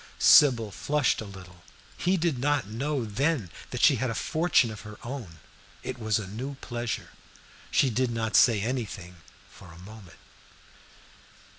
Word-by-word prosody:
Sybil 120 Hz, -8 st, +6 dB
flushed 145 Hz, +5 st, 0 dB
a -, -, -6 dB
little. 90 Hz, -3 st, -12 dB, 0.3 s
He 185 Hz, +2 st, +1 dB
did 160 Hz, -6 st, 0 dB
not 145 Hz, -3 st, +1 dB
know, 130 Hz, +5 st, -2 dB
then, 115 Hz, -, -1 dB, 0.2 s
that -, -, -4 dB
she -, -, +6 dB
had 130 Hz, -, -1 dB
a 115 Hz, -, -3 dB
fortune 155 Hz, -7 st, +2 dB
of 105 Hz, -, -9 dB
her 105 Hz, -1 st, -10 dB
own. 115 Hz, -10 st, -7 dB, 0.5 s
It -, -, -5 dB
was 110 Hz, -2 st, +1 dB
a 110 Hz, -, -4 dB
new 125 Hz, +8 st, -6 dB
pleasure. 120 Hz, -3 st, -5 dB, 0.6 s
She 135 Hz, -, +2 dB
did 125 Hz, +3 st, 0 dB
not 115 Hz, -1 st, -2 dB
say 115 Hz, -5 st, +5 dB
anything 105 Hz, -7 st, -4 dB, 0.3 s
for 95 Hz, -4 st, -15 dB
a 80 Hz, -, -14 dB
moment. 100 Hz, 0 st, -13 dB
115 Hz, 155 wpm, -27 LUFS, 105-135 Hz, 0.6 s, Sybil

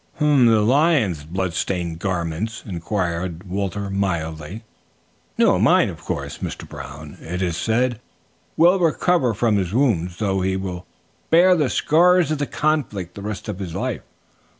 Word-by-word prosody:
'" -, -, -30 dB
"The 150 Hz, -, 0 dB, 0.4 s
lion's 130 Hz, -, +2 dB
bloodstained 85 Hz, 0 st, -2 dB
garments?" 90 Hz, +4 st, -3 dB
inquired 90 Hz, -2 st, -3 dB
Walter 100 Hz, +1 st, -3 dB
mildly. 85 Hz, 0 st, -3 dB, 0.7 s
"No, -, -, +4 dB
mine, -, -, +4 dB
of -, -, -9 dB
course. -, -, -5 dB
'Mr. -, -, -6 dB
Brown, 75 Hz, +2 st, -10 dB
it 90 Hz, +3 st, -5 dB
is 85 Hz, -3 st, -1 dB
said, 115 Hz, +6 st, 0 dB, 0.6 s
will 175 Hz, +4 st, +5 dB
recover 165 Hz, -, +2 dB
from 110 Hz, -1 st, +2 dB
his 95 Hz, +1 st, -2 dB
wounds, 90 Hz, -10 st, +1 dB
though 95 Hz, -3 st, 0 dB
he 95 Hz, 0 st, 0 dB
will 90 Hz, -2 st, -6 dB, 0.4 s
bear 180 Hz, +2 st, +6 dB
the 150 Hz, -6 st, +1 dB
scars 175 Hz, +1 st, +3 dB
of 155 Hz, -, -1 dB
the 145 Hz, -, -1 dB
conflict 115 Hz, -, -1 dB
the 100 Hz, -, -9 dB
rest 105 Hz, 0 st, -5 dB
of 100 Hz, -3 st, -5 dB
his 90 Hz, -4 st, -5 dB
life.' -, -, -3 dB
100 Hz, 150 wpm, -21 LUFS, 90-130 Hz, 0.7 s, bear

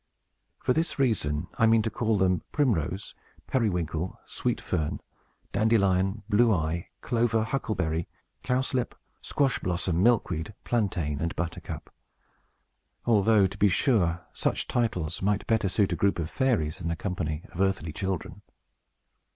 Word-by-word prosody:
For 125 Hz, -, +1 dB
this 165 Hz, +4 st, 0 dB
reason 90 Hz, -, +1 dB
I 115 Hz, -, +6 dB
mean 110 Hz, -1 st, +4 dB
to 110 Hz, -, -1 dB
call 110 Hz, -1 st, +1 dB
them 95 Hz, -1 st, +2 dB
Primrose, 95 Hz, -, 0 dB, 0.3 s
Periwinkle, 90 Hz, -, -1 dB
Sweet -, -, -2 dB
Fern, 75 Hz, -1 st, -2 dB, 0.5 s
Dandelion, 100 Hz, -2 st, +2 dB
Blue 115 Hz, +2 st, +4 dB
Eye, 85 Hz, -2 st, -1 dB
Clover, 115 Hz, -2 st, +1 dB
Huckleberry, 85 Hz, -10 st, -1 dB, 0.3 s
Cowslip, 130 Hz, 0 st, 0 dB, 0.3 s
Squash 135 Hz, -3 st, +1 dB
Blossom, 90 Hz, -1 st, 0 dB
Milkweed, 100 Hz, -6 st, +1 dB
Plantain, 90 Hz, -11 st, 0 dB
and 85 Hz, 0 st, -2 dB
Buttercup; 85 Hz, -2 st, -5 dB, 1.1 s
although, 110 Hz, -2 st, +4 dB
to 95 Hz, -, -3 dB
be 105 Hz, -, +5 dB
sure, 90 Hz, -5 st, +2 dB
such -, -, -1 dB
titles 90 Hz, -10 st, -1 dB
might 105 Hz, +1 st, +1 dB
better 110 Hz, -4 st, +1 dB
suit 100 Hz, +1 st, +2 dB
a -, -, 0 dB
group 100 Hz, 0 st, +2 dB
of 85 Hz, -1 st, -3 dB
fairies 115 Hz, -, +1 dB
than 85 Hz, -2 st, -3 dB
a 85 Hz, -, -1 dB
company 80 Hz, -4 st, -3 dB
of 90 Hz, -, -4 dB
earthly 95 Hz, -5 st, 0 dB
children. 95 Hz, 0 st, -4 dB
95 Hz, 135 wpm, -27 LUFS, 85-115 Hz, 1.1 s, I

